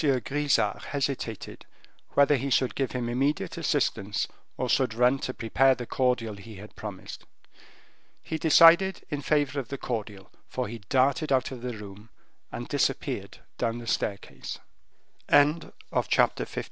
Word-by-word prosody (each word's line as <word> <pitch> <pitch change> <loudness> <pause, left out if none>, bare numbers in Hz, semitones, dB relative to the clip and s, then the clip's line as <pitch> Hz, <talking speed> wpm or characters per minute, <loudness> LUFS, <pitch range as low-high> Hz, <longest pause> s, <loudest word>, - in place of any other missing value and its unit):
Grisart 145 +1 +1
hesitated, 135 -6 -4 0.5
whether 140 +1 +5
he 135 +1 -2
should 130 0 +2
give 135 -2 -2
him 125 -2 -2
immediate 135 +5 0
assistance, 100 +1 0 0.3
or 125 - -1
should 125 -3 +1
run 125 +3 +3
to 130 - -3
prepare 130 +3 +3
the 120 - -6
cordial 120 -4 0
he 110 +2 -11
had 105 +2 -12
promised. 100 -3 -8 1.0
He 160 - -4
decided 170 +4 +6
in 145 -1 -2
favor 145 0 +1
of 130 - -5
the 140 - -5
cordial, 105 -6 -5 0.2
for - - -3
he 115 +2 -7
darted 140 +4 +2
out 130 -1 +2
of 125 -2 -7
the 125 -2 -4
room 105 +1 -11 0.4
and - - -6
disappeared - - -1 0.2
down 115 0 0
the 120 - -8
staircase. 100 -2 -3 0.7
Chapter 150 +3 +2
LIII. - - -5
130 Hz, 145 wpm, -27 LUFS, 115-140 Hz, 1.0 s, decided